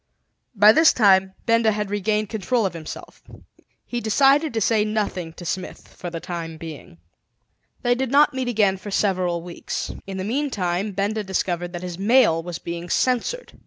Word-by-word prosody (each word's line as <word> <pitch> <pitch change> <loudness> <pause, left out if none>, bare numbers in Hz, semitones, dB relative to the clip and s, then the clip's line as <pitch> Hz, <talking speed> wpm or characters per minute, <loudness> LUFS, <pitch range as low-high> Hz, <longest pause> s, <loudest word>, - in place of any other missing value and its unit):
By 205 +1 +8
this 320 +7 +5
time 190 -4 +4
Benda 230 -1 +3
had 210 -1 -3
regained 210 +1 0
control 220 +2 0
of 190 - -2
himself. 160 -2 -9 0.6
He 240 -1 -4
decided 275 +7 +3
to - - +2
say 220 0 +2
nothing 205 -6 -2
to 175 - -11
Smith 185 +2 -5
for 175 - -8
the 170 -1 -5
time 165 -2 -6
being. 155 - -10 0.9
They 245 - +3
did 260 +1 -2
not 290 +2 +4
meet 260 -1 -2
again 210 -5 +2
for 205 - -9
several 185 -4 0
weeks. 175 -1 -5 0.2
In 195 -1 -5
the 185 - -3
meantime 205 -6 -1
Benda 205 +3 -1
discovered 175 -2 -2
that 175 0 -6
his 180 -1 -6
mail 215 -5 +4
was 170 0 -6
being 170 +1 -6
censored. 255 - -1
200 Hz, 170 wpm, -23 LUFS, 175-230 Hz, 0.9 s, By